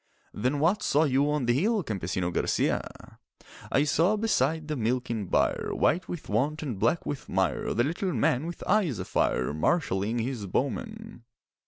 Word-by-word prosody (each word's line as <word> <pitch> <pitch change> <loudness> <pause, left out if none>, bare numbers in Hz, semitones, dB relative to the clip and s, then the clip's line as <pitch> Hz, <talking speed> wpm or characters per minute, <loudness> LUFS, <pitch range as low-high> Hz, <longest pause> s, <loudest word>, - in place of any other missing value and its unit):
'Then 125 +7 0
what 175 +8 +2
saw 150 +3 +3
you 140 0 +2
on 150 -3 0
the 120 - +3
hill, 205 - +1
Campesino 95 - -2
Garcia?' - - -2 0.5
'I 135 - +3
saw 165 +7 +2
beside 160 - +1
the 155 - -2
milking 115 -3 -1
byre, - - +1
White 180 +4 +1
with 175 - -6
want 140 +9 0
and 120 -10 -4
black 115 - +1
with 145 - -5
mire, 95 -1 0
The 120 - +3
little 175 +7 -1
man 140 -1 +1
with 170 - -7
eyes 185 - +2
afire 65 +3 0
Marshalling 100 - 0
his 115 -3 -3
bowmen. 220 - -3
140 Hz, 160 wpm, -28 LUFS, 115-170 Hz, 0.5 s, saw